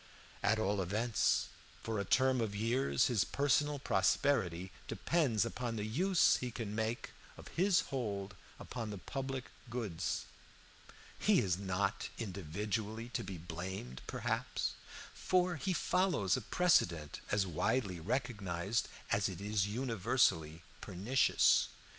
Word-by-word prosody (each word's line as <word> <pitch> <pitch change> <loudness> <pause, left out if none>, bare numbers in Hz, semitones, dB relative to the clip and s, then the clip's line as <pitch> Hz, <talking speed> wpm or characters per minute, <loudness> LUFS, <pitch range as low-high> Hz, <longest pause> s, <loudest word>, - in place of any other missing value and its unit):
At 110 - +3
all 105 -2 +1
events, 105 +5 +1 0.3
for 110 -2 -2
a - - 0
term 130 +3 +3
of 105 -3 -2
years, 120 +4 +2
his 115 -6 +2
personal 145 +1 +1
prosperity 95 - +1 0.2
depends 115 - +1
upon 120 0 -3
the 105 -1 -2
use 180 - +3
he 125 - -3
can 115 -3 -5
make 110 +2 -2 0.3
of - - -11
his 185 +1 +3
hold 100 -7 -3 0.3
upon 115 -3 -5
the 105 - -5
public 135 +5 -5 0.2
goods. 110 -9 -2 0.9
He - - +4
is 90 -1 +1
not 100 0 -1
individually 105 +3 -3
to - - -3
be 95 - -6
blamed, 85 -6 -6
perhaps, - - -2 0.4
for 180 -2 +1
he 155 +7 -1
follows 180 - +2
a 130 - -2
precedent 85 - +2
as 100 -1 +2
widely 95 +2 0
recognized 100 -1 -1 0.2
as 100 -1 +2
it 90 -2 -7
is 100 -1 0
universally 100 - +1 0.2
pernicious. 115 +9 +3
110 Hz, 125 wpm, -35 LUFS, 95-130 Hz, 0.9 s, He